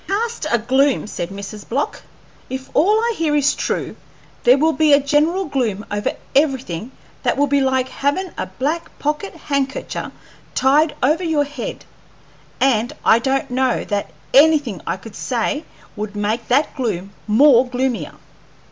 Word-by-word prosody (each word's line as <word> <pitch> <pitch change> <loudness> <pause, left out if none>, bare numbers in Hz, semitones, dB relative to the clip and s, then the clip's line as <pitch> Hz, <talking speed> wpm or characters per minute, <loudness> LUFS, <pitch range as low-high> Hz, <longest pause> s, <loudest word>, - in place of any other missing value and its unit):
"Cast 440 -3 -2
a 240 - +3
gloom!" 265 +5 +2
said 175 -4 -5
Mrs. 200 +1 -8
Block. 275 +5 -2 0.5
"If 260 +1 -6
all 415 +8 +4
I 470 0 +1
hear 315 -4 0
is 290 -1 +3
true, - - -3 0.5
there 250 +2 +7
will 320 +3 +3
be 310 -2 +4
a 285 - +7
general 305 +7 +1
gloom 230 - -2
over 205 0 -1 0.2
everything 265 - 0 0.3
that - - 0
will 285 - +4
be 285 0 +2
like 260 -1 +1
havin' 310 +8 -2
a - - -4
black 310 +6 -3
pocket 305 +7 -2
handkercher 280 -1 -2 0.4
tied 295 +4 +3
over 310 +7 +2
your 315 -4 +2
head, 290 0 -6 0.7
and 245 0 +2
I 225 - +6
don't 270 +1 -1
know 255 0 +1
that 205 -4 -2 0.2
anything 285 - +4
I - - -1
could 205 +2 -12
say 260 +5 -2 0.3
would 210 -1 -5
make 215 +3 -2
that 275 +5 +2
gloom 200 - -3
more 250 +3 +6
gloomier." 245 - -2
270 Hz, 155 wpm, -20 LUFS, 230-300 Hz, 0.7 s, there